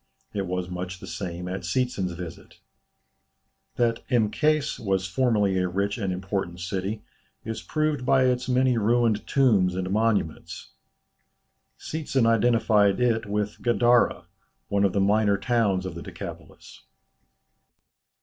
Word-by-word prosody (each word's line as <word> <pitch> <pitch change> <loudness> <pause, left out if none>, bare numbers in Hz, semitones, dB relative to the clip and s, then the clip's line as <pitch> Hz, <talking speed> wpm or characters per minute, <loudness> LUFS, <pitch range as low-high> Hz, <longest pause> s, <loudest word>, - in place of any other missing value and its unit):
It 100 -2 -2
was 90 0 -2
much 90 0 -6
the - - -9
same 90 0 -5
at 95 +1 -4
Seetzen's 95 -2 -1
visit. 85 -1 -9 1.2
That 115 -1 +1
Mkês 140 +6 +1
was 95 -3 0
formerly 100 -1 +1
a 90 - +1
rich 100 +4 -2
and 100 -4 -1
important 90 -1 -3
city, 95 +4 -3 0.4
is 110 -1 -4
proved 155 -3 -1
by 130 +1 +3
its 125 0 0
many 125 -1 +2
ruined 115 0 +1
tombs 105 -10 +3
and 95 0 -3
monuments. 105 -6 -1 1.1
Seetzen 140 -6 -1
identified 115 -3 +3
it 115 -3 +1
with 105 0 -3
Gadara, 120 -6 +3 0.4
one 100 -1 +2
of 95 - +1
the 100 - +1
minor 100 0 +3
towns 100 -4 +1
of 95 - -5
the 85 - -8
Decapolis. - - -10
105 Hz, 130 wpm, -25 LUFS, 95-120 Hz, 1.2 s, by